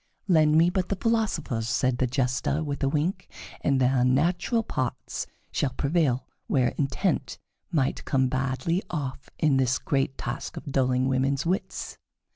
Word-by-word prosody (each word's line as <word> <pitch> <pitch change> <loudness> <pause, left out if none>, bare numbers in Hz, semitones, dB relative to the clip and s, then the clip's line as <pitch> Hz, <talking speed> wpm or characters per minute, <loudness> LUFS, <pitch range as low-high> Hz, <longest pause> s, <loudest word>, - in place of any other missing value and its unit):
"Lend 155 -4 +5
me 170 +2 +5
but 185 -1 -1
the 200 - 0
philosophers," 185 - 0
said 125 +1 +1
the 130 - +2
Jester, 130 +4 0
with 145 -2 -4
a 135 - +3
wink, 165 +6 -1 0.3
"and 135 -2 +2
their 125 0 +3
natural 170 - +2
parts 130 - -3 0.2
shall 135 -3 0
prevail 140 -4 +1 0.2
where 130 -3 +3
intent 135 -2 -1 0.3
might 140 -5 0
come 130 -1 +2
badly 135 +8 0
off 135 -5 -4
in 150 -4 +3
this 130 0 +2
great 135 -1 -1
task 120 +3 -5
of - - -7
dulling 130 -1 +2
women's 135 +2 +1
wits." 185 +3 -2
135 Hz, 150 wpm, -26 LUFS, 130-165 Hz, 0.3 s, Lend